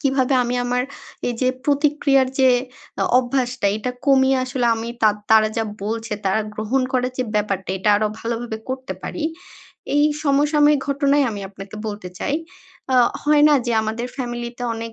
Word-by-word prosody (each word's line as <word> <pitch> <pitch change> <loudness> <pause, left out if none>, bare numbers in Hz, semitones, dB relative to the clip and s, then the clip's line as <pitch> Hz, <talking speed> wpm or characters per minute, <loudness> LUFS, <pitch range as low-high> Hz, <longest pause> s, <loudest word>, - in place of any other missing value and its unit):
কীভাবে 270 -1 +2
আমি 245 +1 -2
আমার 245 +1 0 0.5
এই 245 - -2
যে 255 - +3 0.2
প্রতিক্রিয়ার 285 -2 +2
যে 260 -1 +6 0.5
আ - - +2
অভ্যাসটা 250 -2 -1
এটা 235 +4 -3 0.2
কমিয়ে 265 -1 +4
আসলে 255 -1 -1
আমি 225 +1 -5
তাদ 210 -1 +4
তারা 220 -1 +6
যা 225 - +1 0.2
বলছে 225 +1 -3
তারা 190 +3 +2
গ্রহণ 220 +5 0
করার 250 0 0
যে 255 - +1
ব্যাপারটা, 200 -3 -1
এটা 190 - 0
আরো 215 +1 +1
ভালোভাবে 230 -1 -4
করতে 260 0 -4
পারি? 320 - -4 0.7
এই 290 - +5 0.2
সমসাময়িক 295 0 +3
ঘটনাই 280 +1 +2
আমি 205 - -5
আপনাকে 195 +1 -10
বলতে 205 -3 -5
চাই। 285 - -1 0.6
আ - - +5 0.3
হয় 295 0 +4
না? 300 - +5
যে, 240 - 0
আমাদের 225 +3 -3
ফ্যামিলিতে 240 -1 -5
অনেক 230 0 -6
250 Hz, 165 wpm, -21 LUFS, 220-275 Hz, 0.7 s, যে